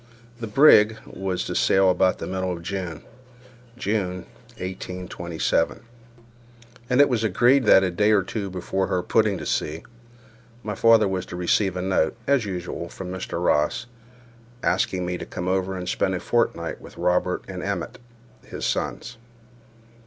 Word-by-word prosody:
The 115 - -4
brig 110 -3 +6
was 95 -1 -3
to - - -4
sail 95 -1 +4
about 90 +1 +2
the - - -6
middle 95 0 -2
of 85 -1 -6
June 90 -4 -5 0.7
(June, 100 -6 -2 0.3
1827), 90 0 -2 1.1
and 125 +1 +2
it 145 - +7
was 120 -4 0
agreed 120 +6 +3
that, 95 - +7
a 90 - 0
day 105 +4 +2
or 105 -3 +4
two 100 +1 -4
before 95 +1 -2
her 90 -1 -1
putting 105 0 +2
to - - -7
sea, 80 +2 -2 0.8
my 105 - -3
father 115 +1 +5
was 95 -1 -3
to - - -7
receive 90 +2 +1
a 90 - -2
note, 95 -1 +1
as 140 -5 +2
usual, 90 -3 -5
from 90 +1 -7
Mr. 95 -2 -4
Ross, 75 +11 +1 0.8
asking 90 0 0
me 90 0 -3
to - - -6
come 90 - -5
over 95 0 0
and 90 0 -6
spend - - 0
a - - -2
fortnight - - -1
with - - -13
Robert 90 0 0
and 95 -2 -6
Emmet 100 -3 -4 0.4
(his - - -6
sons). 125 0 -3
95 Hz, 160 wpm, -24 LUFS, 90-105 Hz, 1.1 s, it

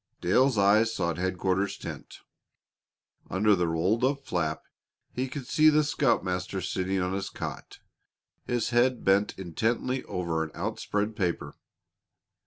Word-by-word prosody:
Dale's 125 +7 +3
eyes 105 +3 +4
sought 85 -6 -2
headquarters 95 +2 0
tent. - - -9 1.1
Under 105 +2 +3
the 90 -2 0
rolled 90 +9 +1
up 140 +1 0
flap 80 -3 -2 0.5
he 130 +1 -3
could 140 -1 -6
see 155 +4 +5
the 155 0 +4
scoutmaster 95 -10 0
sitting 95 +1 -1
on 90 +1 -1
his 95 0 -3
cot, - - -7 0.7
his 120 -1 -1
head 120 +1 +2
bent 100 +2 +2
intently 115 +8 -1
over 85 -3 -2
an 80 - -6
outspread 105 +1 -2
paper. 90 -5 -2
100 Hz, 130 wpm, -28 LUFS, 90-120 Hz, 1.1 s, see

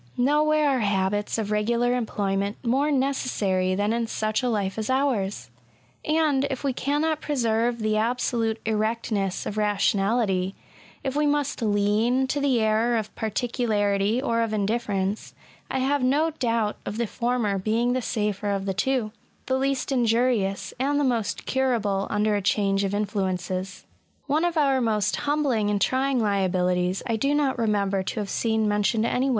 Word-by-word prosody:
Nowhere 295 +1 +3
are - - -1
habits 205 0 0
of 215 -2 -2
regular 235 +3 +1
employment 200 -4 -1
more 275 +5 +2
necessary 210 -9 0
than 205 +3 0
in 235 0 -1
such 215 0 -1
a 250 - 0
life 205 -2 -1
as 220 - -3
ours; 210 - 0 0.5
and, 305 -3 +2
if 270 -1 -4
we 275 -2 0
cannot 295 +4 0
preserve 235 -4 0
the 215 -1 0
absolute 230 -1 0
erectness 215 -3 -1
of 215 - -4
rationality, 200 -1 +1 0.2
— - - -25
if 270 0 -2
we 295 0 +2
must 290 -3 0
lean 215 +4 +2
to 290 - 0
the 280 -3 +2
ierror 225 +2 +2
of 215 - -7
particularity 215 -2 0
or 230 -4 0
of 225 -1 -1
indifference 205 -1 -1 0.2
— - - -25
I - - -1
have 275 +2 +1
no 290 +6 +2
doubt 230 -7 -1
of 210 - -5
the 235 - 0
former 235 -3 -1
being 230 +5 +1
the 255 - 0
safer 210 -3 -2
of 195 -1 -1
the 195 - -1
two; 225 +3 0 0.2
— - - -38
^the 260 -1 0
least 275 +1 -1
injurious, 230 -5 +1
and 285 +2 +1
the - - +2
most 235 -5 -1
curable 225 -7 0
under 210 0 +1
a 205 - 0
change 195 0 +1
of 200 0 -1
influences. 190 -2 -3 0.4
One 300 +4 +1
of 345 -1 -1
our 275 -3 +3
most 215 -3 +1
humbling 285 -8 0
and 205 -1 +1
trying 260 +5 +1
liabilities 185 -3 0
j 230 - -1
I - - +1
do 280 +5 +1
not 275 -4 +1
remember 200 -3 +1
to 190 - -4
have 205 -2 -4
seen 220 -2 +1
mentioned 210 +2 +1
any 255 +3 +1
225 Hz, 170 wpm, -25 LUFS, 205-260 Hz, 0.5 s, Nowhere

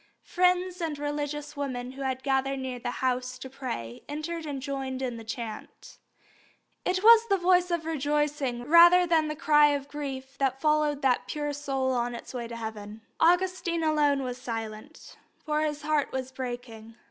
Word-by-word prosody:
Friends 360 0 +1
and 315 -3 -2
religious 295 0 -4
women 255 -3 -4
who 270 +1 -10
had 260 -1 -2
gathered 270 0 +1
near 260 -2 -4
the 245 - -3 0.2
house 255 0 -1
to 260 +1 -9
pray 120 - -6
entered 310 +2 -4
and 280 -2 -4
joined 265 -1 -4
in 250 -3 -3
the 225 - -8
chant. 225 -1 -8 0.8
It 370 +1 0
was 460 +1 +8
the 395 - +4
voice 360 0 +3
of 340 -2 -1
rejoicing 295 -4 -1
rather 345 +5 +7
than 325 -2 +2
the 305 - -3
cry 295 -1 +5
of 285 -1 -1
grief 275 -2 -6
that 270 -1 0
followed 300 -1 +1
that 260 -2 +2
pure 295 -1 -3
soul 270 -2 -1
on 240 -1 -1
its 235 - -9
way 240 -2 -4
to 235 - -7
heaven. 220 -1 -7 0.2
Augustine 350 -1 +2
alone 295 -3 +2
was 250 0 -5
silent, 225 +4 -7 0.2
for 305 -1 -1
his 295 -1 -2
heart 300 -1 +1
was 260 0 -4
breaking. 240 -3 -7
280 Hz, 170 wpm, -28 LUFS, 255-310 Hz, 0.8 s, was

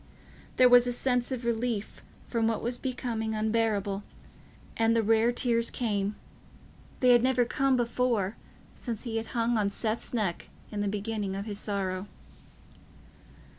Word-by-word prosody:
There 255 - +7
was 245 0 +7
a - - +1
sense 245 0 0
of 250 -2 -3
relief 230 -2 -2 0.2
from 230 -2 0
what 225 - -1
was 240 +1 -2
becoming 235 -4 -3
unbearable, 215 -2 0 0.7
and 225 0 +2
the 225 - +3
rare 225 +2 +3
tears 235 -1 +1
came—they 210 +3 -4
had 240 -1 +6
never 250 -1 +3
come 270 +1 +1
before, 235 -4 0 0.4
since 230 -4 -5
he 230 -3 -3
had 225 0 -3
hung 230 0 +2
on 200 -1 +1
Seth's 220 +2 -2
neck 210 -8 -2 0.2
in 210 -1 -3
the 205 - 0
beginning 205 -1 -2
of 200 +1 -4
his 205 -2 -4
sorrow. 195 -2 -2
225 Hz, 145 wpm, -29 LUFS, 210-245 Hz, 0.7 s, There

